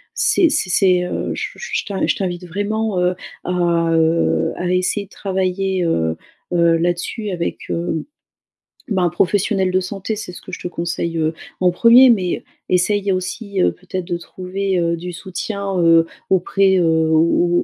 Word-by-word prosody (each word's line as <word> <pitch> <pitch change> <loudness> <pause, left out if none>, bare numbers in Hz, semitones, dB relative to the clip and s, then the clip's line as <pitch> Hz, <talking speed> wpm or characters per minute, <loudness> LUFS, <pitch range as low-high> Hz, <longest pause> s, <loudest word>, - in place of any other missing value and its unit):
c'est 345 - +3
c'est 195 - 0
c'est, 180 -1 +3
heu, - - -3
je - - -4
je 480 - -3
t'in 200 -2 -1
je - - +1
t'invite 180 -2 -3
vraiment, 205 +2 -2
heu, 180 0 +1 0.3
à, - - -2 0.4
heu, 165 +1 +2
à 180 - -2
essayer 185 +3 0
de 200 - -27
travailler, 190 -1 -1
heu, 80 - 0 0.3
heu, 170 -1 +4
là-dessus 175 +6 -2
avec, 175 -3 -3
heu, 170 -2 -2 0.8
ben, 190 -5 0
un 175 - +3
professionnel 190 +2 +1
de 185 - +2
santé. 195 +3 -4
C'est 205 - -6
ce - - -10
que - - -11
je - - -6
te - - -4
conseille, 170 -1 -3
heu, 160 0 0 0.3
en 180 -1 +4
1er, 235 +7 +7
mais 190 -7 +1 0.2
essaye 200 +2 +1
aussi, 185 +2 -3
heu, - - +3
peut-être 185 0 -6
de 175 -1 -2
trouver, 185 +2 -3
heu, 170 0 0
du 175 +1 -6
soutien, 195 +2 -4
heu, 165 -1 +5 0.2
auprès, 190 +1 +3
heu, 175 - +2 0.3
au 170 +2 +3
185 Hz, 170 wpm, -19 LUFS, 175-195 Hz, 0.8 s, 1er